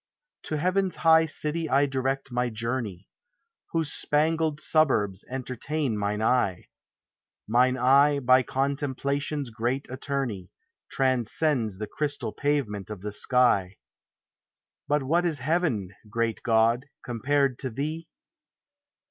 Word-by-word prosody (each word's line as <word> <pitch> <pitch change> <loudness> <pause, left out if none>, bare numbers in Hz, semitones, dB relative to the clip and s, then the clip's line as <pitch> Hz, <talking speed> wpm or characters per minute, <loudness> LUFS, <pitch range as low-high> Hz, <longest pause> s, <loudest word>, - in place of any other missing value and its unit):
To 155 - -2
heaven's 185 +3 +1
high 160 -1 +5
city 155 +1 -3
I 140 +1 +4
direct 135 0 -2
my 125 0 0
journey. 110 -4 -4 0.6
Whose 160 -3 -1
spangled 155 0 +1
suburbs 110 -12 +1
entertain 130 +1 -3
mine 105 +1 -1
eye; 110 -7 +1 0.8
Mine 125 +3 +3
eye, 140 +3 +5
by 130 -1 +5
contemplation's 140 +1 -2
great 120 +5 -2
attorney. 130 -8 -3 0.4
Transcends 130 -3 0
the 105 - -3
crystal 140 0 -3
pavement 130 -10 -1
of 105 -4 -7
the 105 +1 -4
sky: 105 -5 +2 1.1
But 145 -1 +1
what 165 +6 +2
is 165 -4 0
heaven, 135 - 0 0.2
great 115 0 -1
God, 115 +3 +2 0.2
compared 135 +2 0
to 130 - -3
thee? 155 +7 -4
130 Hz, 115 wpm, -26 LUFS, 115-150 Hz, 1.1 s, high